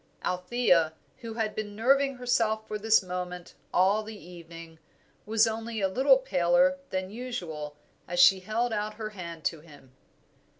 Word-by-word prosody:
Althea, 180 -3 +2 0.2
who 230 -3 -8
had 220 -2 -1
been 205 -1 -5
nerving 275 +4 +3
herself 225 -3 0
for 210 - -4
this 220 -1 +4
moment 180 -1 -6 0.2
all 195 +4 +3
the 215 0 -9
evening, 165 -2 -12 0.5
was 220 +1 +4
only 225 0 -3
a 195 - +2
little 265 +7 +4
paler 265 +4 +2
than 185 0 -3
usual 175 -12 -6 0.3
as 175 0 -3
she 190 +1 +7
held 225 +5 -1
out 210 0 -3
her 215 0 -6
hand 170 -5 -8
to 165 - -1
him. 145 -4 -17
210 Hz, 155 wpm, -28 LUFS, 180-230 Hz, 0.5 s, she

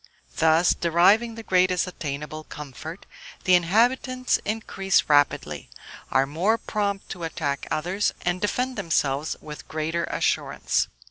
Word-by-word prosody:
Thus, 160 +2 +4
deriving 195 +8 +3
the 225 - -8
greatest 185 -2 +2
attainable 155 -3 -5
comfort, 150 +4 -9 0.4
the 185 - +3
inhabitants 245 +8 +2
increase 195 -3 +1
rapidly, 145 -1 +1 0.4
are 135 +1 +3
more 175 +11 +1
prompt 200 -3 -2
to 180 - -7
attack 145 -4 -3
others, 180 +6 0
and 180 +1 -1
defend 250 +4 -1
themselves 155 -5 0
with 150 -1 -9
greater 160 +2 -2
assurance. - - 0
175 Hz, 120 wpm, -25 LUFS, 155-205 Hz, 0.4 s, Thus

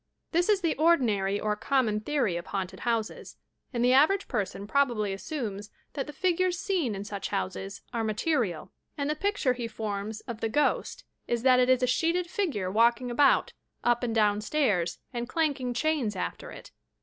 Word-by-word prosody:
This 350 +4 +2
is 410 -2 +4
the 330 -3 +1
ordinary 220 - +2
or 210 0 0
common 225 -2 +1
theory 240 -6 0
of 170 - -5
haunted 190 -2 -4
houses, 230 -2 -3 0.3
and 240 -2 0
the 250 - +5
average 315 +9 +4
person 195 0 -3
probably 225 -5 +1
assumes 205 -3 -5 0.2
that 275 - -3
the - - -6
figures 365 +3 +1
seen 365 - -1
in 195 - -5
such 205 -1 -5
houses 95 +1 -4
are 230 -1 -1
material, 215 - -1 0.3
and 285 -1 -1
the - - -1
picture 390 -7 +1
he 245 -2 -4
forms 215 -1 -4
of 235 -2 -7
the 225 - 0
ghost 295 +6 0 0.2
is 235 -1 -1
that 255 -1 +6
it 250 0 +3
is 255 0 +4
a - - +6
sheeted 335 +7 +1
figure 295 - -1
walking 235 +3 +3
about, 275 +3 +3 0.3
up 240 0 +2
and 235 -2 -2
downstairs, 210 - +1 0.2
and 240 0 -4
clanking 285 -6 0
chains 265 -5 0
after - - -4
it - - -11
240 Hz, 175 wpm, -28 LUFS, 210-295 Hz, 0.3 s, that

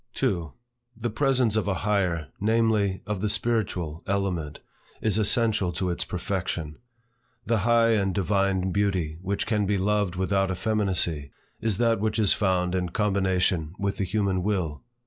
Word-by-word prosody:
2. 85 -5 -1 0.5
The 120 - -3
presence 130 -3 +2
of 110 -2 0
a 100 - +1
higher, 90 -8 0
namely, 110 -3 +1
of 105 -3 -3
the 105 - +1
spiritual 100 -7 -1
element 90 -7 -2 0.4
is 110 -1 +1
essential 105 -3 +2
to 90 +1 -1
its 85 - -2
perfection. 85 -4 -3 0.7
The 115 -1 +1
high 115 +2 +4
and 100 -3 +2
divine 95 0 +1
beauty 90 -6 0
which 100 +2 -1
can 105 -2 0
be 100 0 +1
loved 100 -1 +1
without 95 +1 +1
effeminacy, 90 -7 0 0.3
is 110 -3 0
that 115 -1 +2
which 110 +1 -1
is 105 -3 +4
found 90 -3 +1
in 90 -1 -1
combination 95 -4 0
with 100 0 -2
the 100 - 0
human 95 -1 0
will. 90 -7 -2
100 Hz, 150 wpm, -26 LUFS, 90-105 Hz, 0.7 s, high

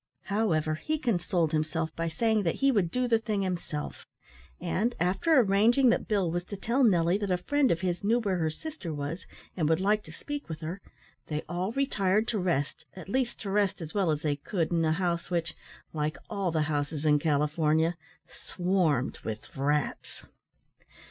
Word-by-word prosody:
However, 170 -7 +1
he 235 - -2
consoled 180 - 0
himself 155 0 -1
by 165 0 -2
saying 220 +6 +1
that 170 -4 0
he 275 0 +3
would 200 -8 +2
do 250 +6 0
the 230 -2 +3
thing 215 -3 -1
himself; 170 -5 -4 0.5
and, 205 +7 0
after 195 - +3
arranging 230 +5 +4
that - - 0
Bill 195 -6 +1
was 175 +1 -1
to 200 - -7
tell 240 +7 +1
Nelly 180 -3 +4
that 205 -2 -2
a 180 - +2
friend 285 +8 +2
of 170 - +1
his 180 -1 -1
knew 225 +4 +3
where 200 -5 0
her 160 -1 +1
sister 250 - -6
was, 145 +4 -5 0.3
and 155 -4 +1
would 160 +1 +3
like 210 +2 +2
to - - -11
speak 290 -7 -6
with 160 0 -6
her, 170 +5 -5 0.5
they 150 -1 -3
all 175 +4 -2
retired 215 -6 +1
to 215 - 0
rest, 170 -6 -1
at 190 0 -9
least 255 +1 -1
to 200 - -4
rest 200 -1 +1
as 160 -2 -7
well 195 -4 +1
as 150 -1 0
they 145 -2 0
could 165 +3 -2
in 165 -1 +2
a 160 - +2
house 170 -1 -1
which, 170 -2 -1 0.4
like 155 0 -1
all 200 -3 0
the 160 -2 +1
houses 150 0 -2
in 150 -1 +5
California, 155 +2 +2 0.3
swarmed 175 -8 0
with 110 -1 -7
rats. 145 +2 -1
180 Hz, 190 wpm, -29 LUFS, 155-210 Hz, 0.5 s, in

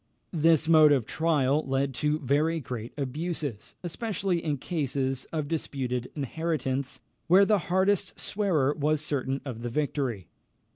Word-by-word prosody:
This 160 -1 +4
mode 155 -2 +7
of 135 -6 +3
trial 150 -1 +1
led 135 0 0
to 150 0 +2
very 150 +5 +1
great 120 -4 -6
abuses, 145 - -4
especially 185 -1 -2
in 150 -3 -1
cases 135 -4 -2
of 155 -3 -2
disputed 130 -6 -3
inheritance, 140 -2 -2 0.3
where 190 +4 +7
the 210 0 +3
hardest 190 +2 +1
swearer 165 -10 +1
was 150 0 0
certain 135 -2 -2
of 120 -4 -6
the 120 - -3
victory. 130 - -2
150 Hz, 135 wpm, -28 LUFS, 135-165 Hz, 0.3 s, mode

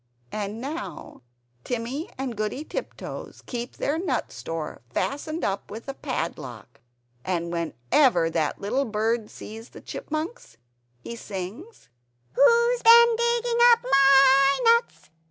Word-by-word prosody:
And 210 +1 -4
now 240 - -7 0.4
Timmy 245 +7 -4
and 260 -3 -4
Goody 215 +7 -3
Tiptoes - - -7
keep 240 0 -6
their 300 +3 -1
nut 315 -9 -2
store 165 -6 -6
fastened 310 - -3
up 195 0 -2
with 220 +3 -8
a 275 - -5
little 275 - -18
padlock. 135 - -5 0.4
And 170 -2 -2
whenever 170 - +2
that 160 -3 -1
little 255 +8 -1
bird 220 0 -1
sees 225 +2 -10
the - - -13
Chipmunks, 310 - -6 0.4
he 235 - -8
sings 215 - -8 0.5
"Who's 470 - +4
been 470 0 +7
digging 470 0 0
up 465 - +2
MY 275 - +5
nuts? 465 - +2
255 Hz, 125 wpm, -25 LUFS, 195-315 Hz, 0.5 s, been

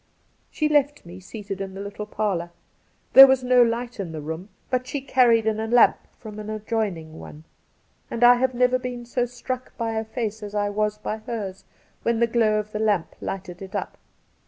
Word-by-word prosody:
She 305 - 0
left 290 -3 +1
me 175 +2 -10
seated 195 0 -7
in 195 -1 -6
the - - -7
little 200 +1 -6
parlour. 195 -6 -2 0.6
There 270 0 +12
was 265 -1 +2
no 250 0 +5
light 235 0 0
in 175 -5 -4
the 155 - -5
room, 160 +6 -6 0.2
but 255 0 0
she 285 - -3
carried 245 -4 +3
in 220 -1 0
a 220 - -2
lamp 240 +1 +5 0.2
from 215 -2 -9
an 215 0 -7
adjoining 205 -7 -3
one; 150 +1 -11 0.7
and 235 - -2
I 245 0 +9
have 255 0 0
never 250 +1 +3
been 250 -1 -6
so 245 +1 -1
struck 250 +1 -6
by 230 -1 -2
a 220 0 -1
face 220 -1 -4
as 210 0 -7
I 205 0 0
was 210 0 -1
by 215 +1 -4
hers 215 -4 -6 0.4
when 230 -1 0
the 235 - +4
glow 225 -2 +2
of 210 0 -4
the 215 - -4
lamp 210 -6 0
lighted 180 -2 -6
it 190 -1 -8
up. - - -4
220 Hz, 205 wpm, -24 LUFS, 200-245 Hz, 0.7 s, There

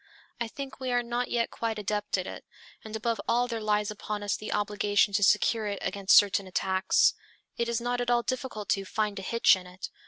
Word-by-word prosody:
I 235 - -1
think 270 +3 -8
we 260 -1 -3
are 245 0 +2
not 240 +1 -2
yet 235 -1 0
quite 225 -1 -3
adept 210 0 -1
at 185 - -3
it; - - -8 0.4
and 220 0 -7
above 225 0 -1
all 240 +1 +2
there 230 -2 -4
lies 210 0 0
upon 210 0 -5
us 205 - 0
the 215 - -6
obligation 205 0 +1
to 205 - +2
secure 210 +2 +3
it 200 -1 -2
against 195 -1 +4
certain 200 -1 +4
attacks. 190 +1 +2 0.4
It 235 0 -1
is 235 0 0
not 245 +1 -1
at 245 - -2
all 240 -1 +3
difficult 255 -5 -4
to 195 - +1
"find 205 +1 -2
a - - -6
hitch" 230 +2 +4
in 180 -1 -9
it. 180 +1 -8
215 Hz, 220 wpm, -28 LUFS, 200-235 Hz, 0.4 s, against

